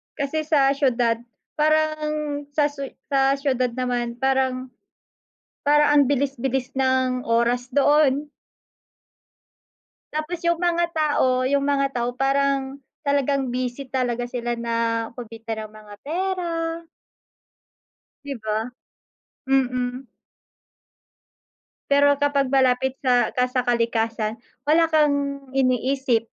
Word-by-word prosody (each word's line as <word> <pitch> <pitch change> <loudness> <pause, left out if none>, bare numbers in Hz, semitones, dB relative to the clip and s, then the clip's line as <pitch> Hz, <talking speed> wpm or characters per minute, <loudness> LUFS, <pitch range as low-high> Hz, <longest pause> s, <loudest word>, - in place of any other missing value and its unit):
Kasi 305 +2 -2
sa 275 -3 +4
siyudad 245 -5 +1 0.4
parang, 305 -1 0
sa 295 -1 +2
siyu 275 -2 -7 0.2
sa 270 0 +3
siyudad 260 -3 0
naman 245 -2 -2
parang 260 0 0 1.0
parang 295 0 +5
ang - - +7
bilis-bilis 270 -2 -1
ng 260 -1 +1
oras 235 +2 +1
doon. 290 0 +3 1.8
Tapos 310 +3 -3
'yung 340 -1 +2
mga 345 -1 +2
tao, 260 -5 +2
'yung 280 +1 +1
mga 280 -1 +2
tao, 240 0 -1
parang 275 +1 0 0.3
talagang 280 -1 +1
busy 255 +2 -3
talaga 245 -2 -1
sila 240 -1 -3
na 230 -1 -1
kumita 225 -2 -7
ng 215 - -8
mga 215 -1 -13
pera. 335 0 -2 1.4
'Di 285 -1 -4
ba. 220 +2 -2 0.8
Mm. 255 -1 0 1.8
Pero 285 0 +4
kapag 280 -2 +1
malapit 265 0 +2
sa 250 -3 +3
ka 250 0 +1
sa 255 0 -1
kalikasan 230 -2 0 0.3
wala 320 +2 +4
kang 285 -3 +1
iniisip. 255 -2 +1
270 Hz, 105 wpm, -23 LUFS, 245-285 Hz, 1.8 s, ang